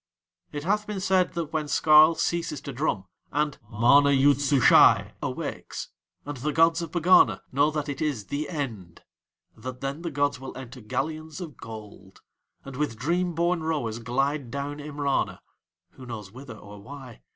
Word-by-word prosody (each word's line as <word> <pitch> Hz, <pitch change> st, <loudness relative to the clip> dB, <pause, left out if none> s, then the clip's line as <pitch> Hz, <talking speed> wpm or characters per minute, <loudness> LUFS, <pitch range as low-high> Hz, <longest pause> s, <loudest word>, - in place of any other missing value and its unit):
It 145 Hz, 0 st, -5 dB
hath 210 Hz, +4 st, 0 dB
been 210 Hz, -2 st, -4 dB
said 185 Hz, -1 st, +2 dB
that 165 Hz, -2 st, -4 dB
when 155 Hz, -1 st, -1 dB
Skarl 155 Hz, +2 st, +6 dB
ceases 165 Hz, -4 st, -1 dB
to 140 Hz, -1 st, -7 dB
drum, 120 Hz, -8 st, -1 dB, 0.3 s
and 150 Hz, 0 st, -1 dB
MANA 125 Hz, +6 st, +5 dB
YOOD 140 Hz, +1 st, +4 dB
SUSHAI 140 Hz, -3 st, +5 dB
awakes, -, -, -5 dB, 0.4 s
and 145 Hz, -1 st, -5 dB
the 145 Hz, +5 st, -2 dB
gods 165 Hz, +2 st, +3 dB
of 165 Hz, -, -5 dB
Pegana 175 Hz, +2 st, +4 dB
know 140 Hz, +3 st, +3 dB
that 150 Hz, -1 st, -3 dB
it 140 Hz, -1 st, -5 dB
is 140 Hz, -10 st, -2 dB
THE 145 Hz, +8 st, -4 dB
END, 115 Hz, -, -6 dB, 0.5 s
that 125 Hz, +3 st, -8 dB
then 135 Hz, +3 st, -4 dB
the 170 Hz, -, -3 dB
gods 145 Hz, -3 st, 0 dB
will 135 Hz, -1 st, -8 dB
enter 125 Hz, -1 st, -9 dB
galleons 155 Hz, -, -4 dB
of 165 Hz, -7 st, -7 dB
gold, 105 Hz, -4 st, -11 dB, 0.4 s
and 135 Hz, -2 st, -8 dB
with 145 Hz, -6 st, -2 dB
dream 175 Hz, +6 st, -1 dB
born 170 Hz, +1 st, +1 dB
rowers 145 Hz, -9 st, -2 dB
glide 135 Hz, +3 st, -1 dB
down 140 Hz, +3 st, -5 dB
Imrana 145 Hz, -2 st, -2 dB, 0.5 s
(who 130 Hz, -, -13 dB
knows 105 Hz, -5 st, -7 dB
whither 125 Hz, -1 st, -10 dB
or 105 Hz, -1 st, -12 dB
why?) 130 Hz, 0 st, -11 dB
145 Hz, 165 wpm, -26 LUFS, 125-155 Hz, 0.5 s, Skarl